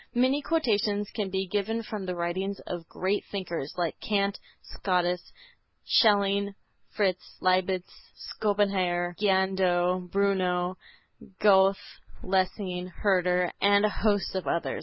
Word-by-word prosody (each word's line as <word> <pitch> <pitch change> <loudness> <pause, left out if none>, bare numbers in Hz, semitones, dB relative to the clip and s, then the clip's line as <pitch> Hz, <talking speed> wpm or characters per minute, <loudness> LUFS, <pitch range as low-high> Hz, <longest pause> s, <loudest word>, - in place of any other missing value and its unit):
Many 260 +4 +3
quotations 210 -10 0
can 210 -4 -2
be 190 0 -1
given 210 +4 -2
from 210 -3 -6
the 180 - -2
writings 185 +3 -2
of 170 -2 -6
great 195 +3 -1
thinkers, 175 -6 -4
like 175 -2 -2
Kant, 200 -1 0 0.2
Scotus, 180 -2 -1 0.5
Schelling, 200 -2 +3 0.4
Fichte, 190 -3 +1 0.2
Leibnitz, 185 0 +1 0.2
Schopenhauer, 185 -4 0
Giardano 190 -2 +2
Bruno, 185 -2 0 0.6
Goethe, 195 -1 +5 0.5
Lessing, 185 -1 -1
Herder 180 -2 +1
and 200 +1 +5
a - - +3
host 205 -1 0
of 190 -1 -3
others. 170 - -1
190 Hz, 115 wpm, -27 LUFS, 180-205 Hz, 0.6 s, Goethe